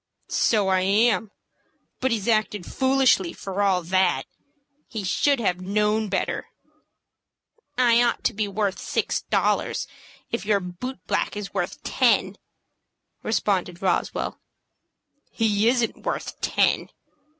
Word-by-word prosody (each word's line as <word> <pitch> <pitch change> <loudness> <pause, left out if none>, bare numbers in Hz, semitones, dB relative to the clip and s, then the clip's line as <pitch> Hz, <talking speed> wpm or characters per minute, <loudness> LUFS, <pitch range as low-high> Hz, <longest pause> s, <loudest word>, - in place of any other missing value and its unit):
"So 210 -4 +2
I 190 0 +3
am; 210 +2 +2 0.7
but 260 - +1
he's 225 -4 -1
acted 215 -4 +1
foolishly 260 -9 +2
for 195 +1 -4
all 190 -3 +2
that. 185 +1 +2 0.6
He 220 -3 -5
should 275 +8 +2
have 180 -5 0
known 210 +2 +1
better." 190 - -2 1.3
"I 240 -2 +5
ought 240 - +1
to 245 - +1
be 210 0 -1
worth 200 -1 -1
six - - -1
dollars, - - 0 0.5
if 235 - -2
your 205 -1 +2
boot 185 +9 -7
black - - -1
is 210 -1 -6
worth 200 - -3
ten," 205 -6 +2 0.8
responded 190 -5 -1
Roswell. 190 - -1 0.9
"He 215 -1 +1
isn't 240 -2 0
worth - - -4
ten." - - +1
210 Hz, 120 wpm, -24 LUFS, 190-230 Hz, 1.3 s, I